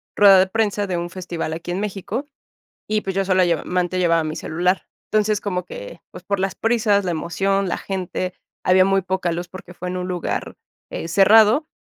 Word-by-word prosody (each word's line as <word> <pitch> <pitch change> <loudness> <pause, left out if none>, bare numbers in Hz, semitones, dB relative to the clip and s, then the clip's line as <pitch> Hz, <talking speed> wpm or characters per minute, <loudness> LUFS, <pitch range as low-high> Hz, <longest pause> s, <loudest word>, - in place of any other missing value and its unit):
rueda 200 -2 +8
de 185 - +4
prensa 205 -1 0
de 180 - -2
un 175 0 -3
festival 175 -3 -5
aquí 165 +2 -5
en 185 +3 -2
México 210 +8 -4 0.6
y, 215 0 0
pues, 195 -2 -4
yo 195 - +2
sólo 185 -1 +3
lleva 170 -3 0
mente 180 0 -1
llevaba 165 -2 +2
mi 155 0 -4
celular. 180 +4 0 0.3
Entonces, 215 -1 +2
como 180 -3 -3
que, - - -9
pues, - - -11
por 200 - -2
las 190 0 -1
prisas, 215 -4 +1
la 175 - 0
emoción, 195 +5 0
la 180 - -2
gente, 185 -1 -4 0.3
había 185 0 +5
muy 195 0 +2
poca 185 -1 -1
luz 175 +1 -4
porque 180 -1 -11
fue 180 0 -6
en 180 - -3
un 180 0 -3
lugar, 180 -2 -3 0.4
eh, 165 - -5
cerrado. 215 - +5
185 Hz, 205 wpm, -21 LUFS, 180-205 Hz, 0.6 s, rueda